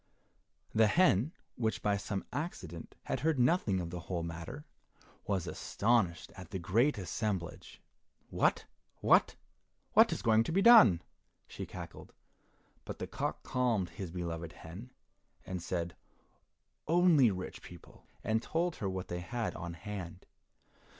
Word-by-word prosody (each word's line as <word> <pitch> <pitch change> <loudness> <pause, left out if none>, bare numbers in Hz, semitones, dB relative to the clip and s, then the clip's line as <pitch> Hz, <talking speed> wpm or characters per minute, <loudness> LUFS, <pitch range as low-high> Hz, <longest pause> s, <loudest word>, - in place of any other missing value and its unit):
The 110 0 +5
hen, 145 - +4 0.3
which 110 -3 -1
by 105 -1 +2
some 100 0 -4
accident 95 - -5
had - - -2
heard 160 -1 +1
nothing 125 - +2
of 85 -2 -4
the 90 - -4
whole 85 0 -4
matter, 85 - -7 0.6
was 95 -4 0
astonished 100 -7 0
at 90 -4 -10
the 95 - -4
great 110 - +2
assemblage. 95 -1 -4 0.5
"What, - - +2 0.3
what, - - +4 0.6
what - - +7
is - - -3
going 110 0 +4
to - - -2
be 195 +4 +2
done?" 215 - +8 0.4
she - - -7
cackled; - - -9 0.7
but - - -7
the - - -4
cock - - -3
calmed 115 -8 0
his 95 0 -6
beloved 85 -1 -5
hen, 90 +10 -10 0.6
and 90 -2 -4
said, 85 0 -3 0.9
"Only 165 -6 +5
rich 95 -2 -5
people," 85 -1 -14 0.2
and 110 0 +1
told 165 +5 -1
her 100 - -2
what 95 -1 -4
they 85 - -4
had 110 +6 -3
on 85 -1 -6
hand. 90 -1 -7
100 Hz, 140 wpm, -32 LUFS, 85-120 Hz, 0.9 s, done